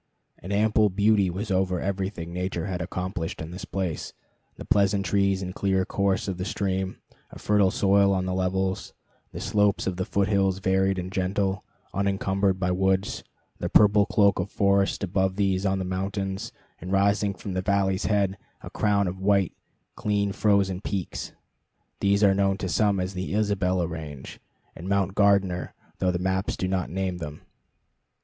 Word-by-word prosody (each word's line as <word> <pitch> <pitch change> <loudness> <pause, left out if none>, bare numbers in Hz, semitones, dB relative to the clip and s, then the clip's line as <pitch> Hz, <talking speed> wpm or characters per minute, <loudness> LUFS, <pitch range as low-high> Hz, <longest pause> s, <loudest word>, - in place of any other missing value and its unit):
An 95 - -8
ample 105 +1 +3
beauty 100 0 +3
was 100 +4 -4
over 95 -1 +1
everything 95 -3 -3
Nature 90 -1 -3
had 90 -2 -3
accomplished 90 -1 -4
in 80 +1 -6
this 95 +3 -7
place; 95 -6 -3 0.4
the - - -9
pleasant 100 -1 +2
trees 100 +1 +1
and 90 0 -5
clear 95 -1 +1
course 100 0 0
of 95 -2 -3
the - - -1
stream, 95 -1 -2 0.3
a - - -11
fertile 105 -2 +3
soil 100 +1 +3
on 95 -1 0
the 95 - -2
levels, 95 +1 -1 0.4
the - - -7
slopes 105 -1 +1
of 95 -2 -2
the 95 - -1
foot 100 -1 0
hills 95 -2 +2
varied 95 0 +1
and 90 0 -4
gentle, 95 +1 -1 0.3
unencumbered 95 0 0
by 90 0 0
woods, 95 +1 0 0.4
the - - -2
purple 105 0 +5
cloak 100 -1 +3
of - - -2
forest 100 0 +1
above 95 0 0
these 95 -1 +1
on 95 0 +1
the 95 - -3
mountains, 95 +1 -3 0.3
and 90 +3 -7
rising 100 +1 +2
from 100 -1 -6
the 95 - -1
valley's 95 0 +1
head 100 -2 +1 0.2
a - - -8
crown 100 -2 +1
of 90 +1 -4
white, 100 -2 +2 0.4
clean 100 -1 0
frozen 100 -2 +1
peaks. 95 -4 -4 0.7
These 100 +1 +2
are 100 -1 +6
known 95 0 +1
to 95 - -3
some 100 +1 +2
as 90 +1 -2
the 95 +2 -3
Isabella 95 -4 +1
Range 80 -5 -7 0.4
and 90 +4 -7
Mount 100 -1 +1
Gardner, 100 -3 +2 0.2
though 95 - +2
the 90 - 0
maps 95 +1 -1
do 90 - -1
not 95 -2 -1
name 95 0 -2
them. 75 -2 -7
95 Hz, 170 wpm, -26 LUFS, 95-100 Hz, 0.7 s, are